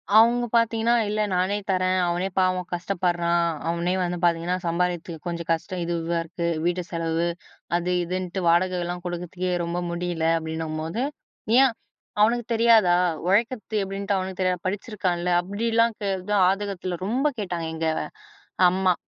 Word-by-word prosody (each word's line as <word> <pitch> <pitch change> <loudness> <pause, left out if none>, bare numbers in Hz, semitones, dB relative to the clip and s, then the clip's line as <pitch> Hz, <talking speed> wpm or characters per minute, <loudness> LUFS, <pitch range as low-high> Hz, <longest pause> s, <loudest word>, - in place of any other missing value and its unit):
அவங்க 235 +2 +6
பாத்தீங்கன்னா, 230 0 +3 0.2
"இல்ல 215 0 0
நானே 185 +3 +1
தரேன், 185 0 +2
அவனே 175 +2 0
பாவம் 185 -1 +1
கஷ்டப்படுறான். 175 -1 0 0.2
அவனே 170 +2 0
வந்து 175 0 -1
பாத்தீங்கன்னா, 170 +1 +2
சம்பாரிக்கிறதுக்கு 170 -1 -2
கொஞ்சம் 170 -1 -4
கஷ்டம் 175 +2 -2
இதுவா 170 0 -1
இருக்கு. 170 +1 -4 0.2
வீட்டு 175 +1 0
செலவு, 165 0 -1 0.5
அது, 175 +1 -2
இதுன்ட்டு, 185 +1 -3
வாடகைலாம் 175 0 +1
கொடுக்குறதுக்கே 180 +1 -3
ரொம்ப 170 +1 -2
முடியல," 170 -1 -2
அப்படின்னம்போது, 160 +5 -3 0.6
"ஏன்? 265 -4 +4 0.5
அவனுக்கு 230 +2 +3
தெரியாதா? 225 -6 +5 0.3
உழைக்கற்த்து 215 +1 +1
எப்படின்ட்டு 195 0 -2
அவனுக்கு 185 0 -4
தெரியாதா? 180 -1 0
படிச்சிருக்கான்ல" 185 -3 -2
அப்படிலாம் 225 +4 +1
கே 200 - -1
அதான் 190 0 +2
ஆதங்கத்தில 195 -3 -3
ரொம்ப 260 +6 +1
கேட்டாங்க 175 -4 -3
எங்க 160 0 -1 0.8
அம்மா. 185 -1 +2
180 Hz, 130 wpm, -25 LUFS, 170-200 Hz, 0.8 s, அவங்க